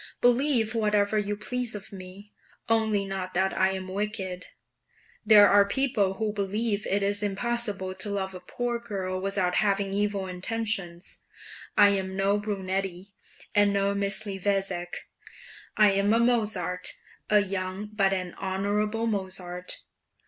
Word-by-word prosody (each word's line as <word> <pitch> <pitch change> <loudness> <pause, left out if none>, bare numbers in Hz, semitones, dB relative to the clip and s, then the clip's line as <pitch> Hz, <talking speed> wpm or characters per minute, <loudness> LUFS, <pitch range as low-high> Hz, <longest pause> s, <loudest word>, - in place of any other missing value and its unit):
"Believe 245 -2 +3
whatever 210 -1 +2
you 205 0 -2
please 245 +1 -3
of 200 0 -9
me, 190 +2 -11 0.3
only 220 -3 +2
not 190 -2 -5
that 190 +1 +2
I 190 - +3
am 190 -1 -5
wicked. 190 -2 -3 0.8
There 210 -2 +8
are 200 0 +6
people 205 -4 +1
who 215 +1 -2
believe 210 +1 -1
it 200 +1 +1
is 205 +1 +1
impossible 205 -2 -2
to 190 +2 -3
love 190 -1 -2
a 185 - -7
poor 240 +6 -3
girl 190 -5 -4
without 190 -2 0
having 200 -2 +1
evil 205 -1 0
intentions. 185 -2 -3 0.6
I 205 - +8
am 190 -1 -1
no 200 +1 +2
Brunetti, 195 -2 -3 0.4
and 205 -1 +4
no 200 0 +1
Misliweczeck 195 -3 0 0.8
I 210 -1 +6
am 200 +1 +2
a 230 - +4
Mozart, 215 -6 +1 0.4
a 210 -1 +5
young 190 +1 -4
but 195 -2 +2
an 185 -2 -2
honourable 205 +3 -1
Mozart." 185 -4 -3
200 Hz, 135 wpm, -27 LUFS, 190-210 Hz, 0.8 s, There